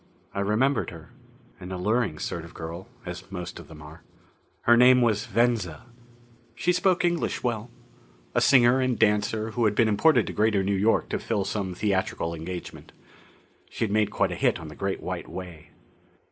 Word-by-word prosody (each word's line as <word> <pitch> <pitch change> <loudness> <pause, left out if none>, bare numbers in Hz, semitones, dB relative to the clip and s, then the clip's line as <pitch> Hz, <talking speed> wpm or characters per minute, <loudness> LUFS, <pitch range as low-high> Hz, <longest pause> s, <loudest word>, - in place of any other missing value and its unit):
I - - -3
remembered 110 +8 +1
her. 80 -2 -12 0.5
An 90 +1 -8
alluring 100 -1 0
sort 85 +2 -4
of 85 - -13
girl, 85 +3 -7 0.2
as 90 +2 -8
most 90 -2 -6
of - - -12
them 75 -2 -12
are. 75 +2 -12 0.6
Her 120 - +5
name 125 +1 +6
was 110 0 +1
Venza. 115 -9 0 0.7
She 180 +8 +1
spoke 180 0 +2
English 175 -1 -1
well. 120 -1 -2 0.6
A - - +2
singer 130 0 +5
and 130 -2 0
dancer 110 +1 +1
who 120 +1 0
had 105 -1 +2
been 115 - +4
imported 110 +3 +4
to - - -5
Greater 105 -2 +2
New 100 +1 0
York 105 +4 +2
to - - -2
fill 105 -4 -1
some 95 -2 -3
theatrical 95 -4 -1
engagement. 85 +2 -8 0.8
She'd 110 -3 -2
made 105 0 +2
quite - - 0
a - - -3
hit - - +1
on - - -8
the - - -11
Great - - -3
White - - -4
Way. 85 -2 -9
105 Hz, 175 wpm, -26 LUFS, 90-120 Hz, 0.8 s, name